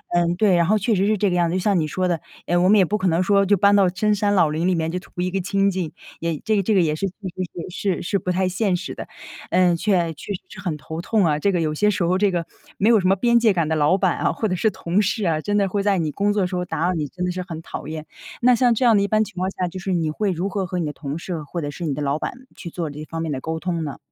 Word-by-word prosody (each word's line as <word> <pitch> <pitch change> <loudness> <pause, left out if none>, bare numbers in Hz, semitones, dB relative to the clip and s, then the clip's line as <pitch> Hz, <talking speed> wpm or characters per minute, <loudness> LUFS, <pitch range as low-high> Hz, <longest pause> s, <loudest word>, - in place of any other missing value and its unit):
嗯， 175 0 +2
对， 190 -1 +3
然 170 -1 +3
后 215 - +4
确 220 +2 +1
实 195 0 +2
是 215 0 +2
这 195 -1 +1
个 - - 0
样 175 -1 +2
子， 175 - -1
就 - - +1
像 195 -1 +2
你 155 - 0
说 185 +4 -1
的， 170 -2 0 0.3
诶， 175 - 0
我 180 +1 +4
们 215 - +6
也 190 - +5
不 210 +4 -1
可 185 - +1
能 175 +1 +2
说 200 +1 +3
就 200 +1 +3
搬 200 +2 +5
到 195 -2 +5
深 210 +4 +1
山 205 0 +1
老 170 -5 +4
林 165 +4 0
里 185 - +2
面， 165 -1 -1
就 180 - -2
图 - - -18
一 180 0 -1
个 195 - -1
清 195 +2 +1
静， 180 -4 -3 0.3
也 165 -2 -2
这 220 - +2
个 200 - +2
这 210 +3 +1
个 185 - +5
也 155 -2 +1
是 195 +5 -1
确 185 - -8
实 185 -3 -6 0.3
是 190 +1 -1
是 - - -6
是 200 +2 0
不 180 - -2
太 185 +1 +1
现 190 +1 0
实 185 - -6
的。 - - -8 0.4
呃， 180 -1 +3
确 170 -2 +1
确 180 - -8
实 - - -8
是 200 - -11
很 175 -6 -3
头 160 +3 -6
痛 205 +1 +2
啊， 150 -2 +1
这 200 +6 +2
个 175 -3 0
有 155 -1 0
些 210 +7 +2
时 195 -3 0
候 175 +2 +2
这 205 0 +3
个 175 -2 -2 0.3
没 210 - +3
有 225 -3 +6
什 185 - 0
么 190 - +4
边 235 +4 +3
界 225 -2 +4
感 170 -4 0
的 160 - 0
老 155 +4 +3
板 185 -3 +1
啊， - - +1
或 220 - -2
者 185 - -1
是 220 +5 +2
同 180 -1 0
事 205 +1 -1
啊， 160 -3 +1
真 205 +4 0
的 200 -1 +2
会 200 +1 -1
在 200 -1 +2
你 155 -3 -1
工 205 +4 0
作 205 - +1
的 - - +1
时 180 - -5
候 180 - -1
打 - - -4
扰 180 - +1
你， 155 -3 -2
真 180 +5 -6
的 180 - -1
是 185 - -4
很 165 -1 -6
讨 165 - -7
厌。 155 0 -6 0.4
那 250 +1 +5
像 245 0 +3
这 240 - 0
样 230 -2 +6
的 - - +3
一 - - 0
般 215 +1 +2
情 205 -2 -10
况 185 +1 0
下， 180 -2 -2
就 185 +2 -7
是 190 0 -2
你 165 -3 0
会 200 +4 -1
如 180 +3 -2
何 195 -1 -2
和 180 0 -4
你 165 - -1
的 150 - -2
同 145 +1 -5
事 170 -2 -5
或 170 +4 -5
者 145 - -3
是 170 +4 -6
你 150 - -1
的 150 - -4
老 145 +1 0
板 - - -3 0.2
去 170 - -8
做 165 -1 -4
这 150 +1 -8
方 165 +1 -5
面 160 -2 -2
的 135 - -2
沟 160 +2 -3
通 170 -1 -2
呢？ 145 -3 -5
185 Hz, 365 characters per minute, -22 LUFS, 165-200 Hz, 0.4 s, 们